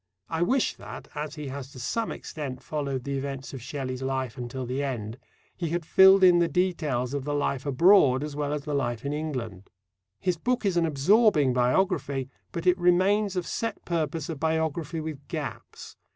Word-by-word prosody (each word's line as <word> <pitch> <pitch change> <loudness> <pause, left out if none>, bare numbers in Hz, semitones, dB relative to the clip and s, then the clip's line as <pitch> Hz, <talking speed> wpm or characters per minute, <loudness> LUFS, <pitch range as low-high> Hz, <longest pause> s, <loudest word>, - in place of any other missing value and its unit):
I 165 0 -2
wish 255 +9 +2
that, - - -9
as 150 0 -5
he 150 -3 -6
has 135 0 -7
to 130 - -10
some 225 - -2
extent 135 -5 -6
followed 140 -4 -3
the 140 0 -2
events 135 0 -5
of 135 - -6
Shelley's 130 0 -4
life 130 -2 -2
until 125 +1 -5
the 130 +3 -2
end, 120 -4 -4 0.4
he 170 -3 -3
had 170 0 -2
filled 190 +2 +7
in 180 -2 +7
the 170 - +3
details 155 -7 0
of 140 -2 -2
the 145 +1 -2
life 140 -1 -1
abroad 140 -2 +5
as 150 -1 -5
well 145 -1 -2
as 150 -1 -2
the 150 0 -4
life 120 -3 -1
in 140 - -1
England. 125 -11 -5 0.5
His 180 -2 0
book 245 +6 -1
is 195 -3 +1
an 170 -1 +3
absorbing 155 - +4
biography, 135 0 +1 0.2
but 170 - -5
it 180 0 +4
remains 190 +3 +3
of 180 -2 -1
set 230 - -4
purpose 165 -2 -2
a 165 - -4
biography 160 +1 -1
with 155 -3 -6
gaps. - - -7
150 Hz, 190 wpm, -27 LUFS, 135-175 Hz, 0.5 s, filled